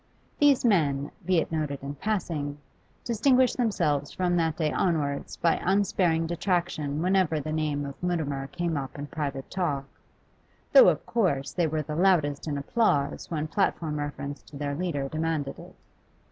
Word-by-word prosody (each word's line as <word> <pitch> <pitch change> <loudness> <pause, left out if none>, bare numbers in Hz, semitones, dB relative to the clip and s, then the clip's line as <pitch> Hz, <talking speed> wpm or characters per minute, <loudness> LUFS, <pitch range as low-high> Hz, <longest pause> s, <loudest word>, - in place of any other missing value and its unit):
These 285 -4 +4
men, 145 -10 +2 0.2
be 185 -1 +3
it 160 - 0
noted 150 -4 -2
in 140 +1 -4
passing, 155 -5 -2 0.5
distinguished 250 +2 +3
themselves 150 - 0
from 180 -1 0
that 160 -2 +1
day 155 -3 0
onwards 150 -6 -1
by 170 -1 +2
unsparing 180 -4 +2
detraction 170 -4 -1
whenever 185 -4 +2
the 155 +2 -4
name 150 -2 -1
of 140 -1 -8
Mutimer 150 -6 -1
came 170 0 -2
up 135 -1 -5
in 145 - -4
private 145 -4 -4
talk, 150 -7 -1 0.9
though, - - +9
of - - -1
course, 175 - 0
they 175 -2 +1
were 155 0 -1
the 150 +1 -5
loudest 160 -5 +2
in 145 -2 -1
applause 145 -3 0
when 155 -2 -2
platform 160 -5 0
reference 145 -1 -5
to 145 - -12
their 145 0 -2
leader 145 -4 -2
demanded 155 -1 -2
it. - - -12
155 Hz, 160 wpm, -27 LUFS, 145-180 Hz, 0.9 s, though